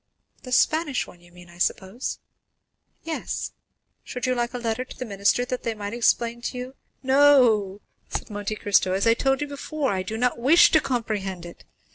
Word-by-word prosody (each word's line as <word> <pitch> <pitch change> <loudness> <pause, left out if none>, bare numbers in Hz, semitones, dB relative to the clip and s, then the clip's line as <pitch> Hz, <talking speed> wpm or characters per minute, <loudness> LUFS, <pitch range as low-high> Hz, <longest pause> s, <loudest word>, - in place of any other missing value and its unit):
"The 255 - -10
Spanish 305 +1 +2
one, 175 - -16
you 175 0 -19
mean, 175 0 -15
I 175 0 -16
suppose?" 190 +6 -2 0.9
"Yes; 325 -1 -4 0.5
should 250 -1 -5
you 255 - +2
like 240 -1 -1
a - - -1
letter 235 +1 -2
to 255 - -13
the 255 - -4
minister 200 +3 +1
that 250 0 -4
they 230 -1 -3
might 205 0 -5
explain 235 0 +1
to 250 - -4
you——" 250 +2 -7 0.3
"No," 255 -8 +4 0.3
said - - -5
Monte 205 +1 -3
Cristo; 200 -3 +2
"since, 195 - -1
as - - +3
I 230 - +6
told 270 +3 0
you 295 - -1
before, 285 0 -3
I 190 -1 -1
do 215 +4 -5
not 245 0 0
wish 285 +8 +6
to 315 - +5
comprehend 205 -8 -3
it. 170 - -12
235 Hz, 195 wpm, -24 LUFS, 200-255 Hz, 0.9 s, I